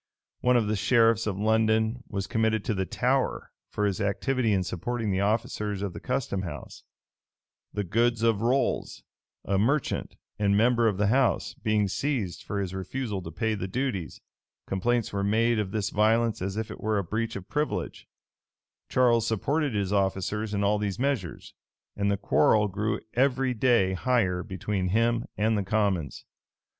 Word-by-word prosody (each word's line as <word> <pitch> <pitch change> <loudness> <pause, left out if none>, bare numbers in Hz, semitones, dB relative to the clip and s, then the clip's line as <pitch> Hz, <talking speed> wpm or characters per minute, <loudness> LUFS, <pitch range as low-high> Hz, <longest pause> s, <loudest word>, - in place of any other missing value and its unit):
[] - - -66
One 125 0 +4
of 115 - +2
the 105 +1 0
sheriffs 115 +1 +3
of 100 -3 -2
London 110 +2 +2
was 100 -2 -3
committed 110 0 0
to 115 - 0
the 95 -2 -2
Tower - - 0 0.2
for 105 - -1
his 100 -2 -1
activity 115 +4 0
in 95 -2 +2
supporting 110 +5 -3
the 95 - 0
officers 105 -1 -1
of 100 -3 -3
the - - -7
custom 125 -7 -2
house: 90 - -8 0.9
the 105 - -2
goods 115 +4 +1
of 115 -3 +2
Rolles, 130 +4 0 0.4
a 95 0 +1
merchant, 135 +7 0 0.2
and 100 -1 +3
member 115 +1 +3
of 105 -4 0
the 105 - +2
house, 130 +2 +2
being 110 -2 0
seized 115 -4 -2
for 100 - -4
his 95 -2 -3
refusal 100 +2 -4
to 80 - -7
pay 110 +7 -1
the 95 -3 -3
duties, 115 -5 -3 0.5
complaints 115 +4 0
were 100 0 -1
made 115 +3 +2
of 105 -3 -1
this 105 0 -2
violence 110 0 +2
as 95 +2 -3
if 110 0 -3
it - - -9
were 110 0 0
a 100 - 0
breach 110 +5 -3
of 95 -2 -7
privilege:[v] 145 - -3 0.8
Charles 120 -3 +3
supported 140 +5 0
his 100 -1 -1
officers 100 +2 0
in 100 - 0
all 105 +1 +2
these 100 -2 -2
measures; 125 - -2 0.4
and 100 0 0
the 100 - +1
quarrel 105 +1 +3
grew 105 +2 -2
every 130 0 +2
day 115 -5 +3
higher 95 -4 +1
between 95 0 -3
him 115 +4 +1
and 110 +1 +2
the 100 - 0
commons. 95 -7 -1
110 Hz, 170 wpm, -27 LUFS, 100-115 Hz, 0.9 s, One